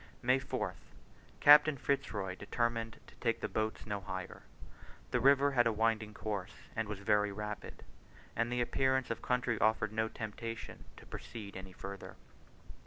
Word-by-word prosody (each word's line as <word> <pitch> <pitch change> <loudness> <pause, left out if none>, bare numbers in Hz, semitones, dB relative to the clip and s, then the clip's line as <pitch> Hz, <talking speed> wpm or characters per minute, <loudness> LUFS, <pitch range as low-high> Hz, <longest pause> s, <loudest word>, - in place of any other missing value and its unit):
May 130 +2 +4
4th. 130 - -3 0.6
Captain 150 0 +8
Fitz 140 +2 0
Roy 95 -3 -2
determined 115 +3 -2
to - - -16
take 115 -2 0
the - - -2
boats 110 0 -2
no 105 -2 -2
higher. 95 -1 -6 0.7
The 125 - +2
river 140 +2 +5
had 120 -3 +4
a - - +3
winding 110 -1 0
course, 100 -3 -4 0.2
and 110 -2 -1
was 105 -1 -4
very 105 0 +2
rapid; 105 +1 -6 0.5
and 115 +1 0
the 125 0 +1
appearance 130 +1 +1
of 115 - -2
the - - -11
country 125 -3 +1
offered 110 -1 +2
no 110 0 +1
temptation 115 +1 -6
to - - -13
proceed 105 -4 -8
any 95 0 -7
further. 100 +1 -8
110 Hz, 165 wpm, -34 LUFS, 105-120 Hz, 0.7 s, Captain